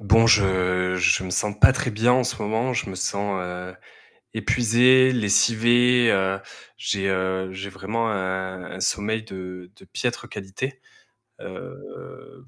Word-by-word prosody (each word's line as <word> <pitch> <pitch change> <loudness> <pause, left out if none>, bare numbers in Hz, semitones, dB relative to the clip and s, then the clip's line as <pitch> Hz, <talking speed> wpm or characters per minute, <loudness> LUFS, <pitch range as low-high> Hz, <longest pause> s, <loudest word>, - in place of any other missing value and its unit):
Bon, 110 +2 +4
je 90 -3 +2
je 90 +1 +2
me 90 - -6
sens 105 +3 -2
pas 120 - +7
très 125 -1 -2
bien 115 +3 +2
en 125 0 +2
ce 125 -2 -4
moment. 110 +5 -1
Je 120 - -2
me 95 - -6
sens, 100 +1 -2
heu, 90 +1 -7 0.6
épuisé, 125 +2 +4
lessivé, 120 +2 +3
heu, 95 0 +1 0.4
j'ai, 95 -1 -2
heu, 95 0 -2
j'ai 95 +1 -7
vraiment 105 +4 -3
un 95 -2 -4
un 95 - -8
sommeil 110 +3 -1
de 90 -3 -9
de - - -17
piètre - - -4
qualité. 100 +8 -6 0.6
Heu, 455 -2 -11
100 Hz, 145 wpm, -23 LUFS, 95-120 Hz, 0.6 s, pas